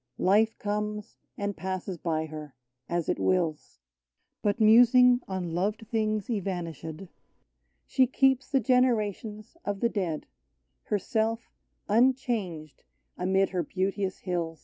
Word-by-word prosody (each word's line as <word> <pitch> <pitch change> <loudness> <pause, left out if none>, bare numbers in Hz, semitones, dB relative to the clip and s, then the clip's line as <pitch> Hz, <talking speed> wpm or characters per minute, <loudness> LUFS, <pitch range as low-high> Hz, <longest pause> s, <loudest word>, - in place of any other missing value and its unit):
Life 215 +4 +3
comes, 210 +1 -4 0.2
and 205 -1 -2
passes 185 0 -4
by 160 -1 -1
her, 155 -2 -9 0.3
as 170 -1 -1
it - - 0
wills; 170 -5 0 0.6
But 205 +2 0
musing 245 +3 +6
on 185 -3 -3
loved 210 +5 -1
things 215 -2 0
evanish^. 175 - -4 0.8
She 260 -1 +3
keeps 265 0 +2
the 270 - +3
generations 220 - 0
of 205 -1 -3
the 235 - +2
dead, 180 -8 -2 0.3
— 60 0 -50
Herself 220 +2 -1 0.4
unchanged 215 - 0 0.3
amid 190 +2 +1
her 180 -1 0
beauteous 190 +2 -2
hills: 185 - -9 0.2
38 - - -6
OLD 165 0 -13
ST. - - -32
200 Hz, 130 wpm, -28 LUFS, 175-225 Hz, 0.8 s, musing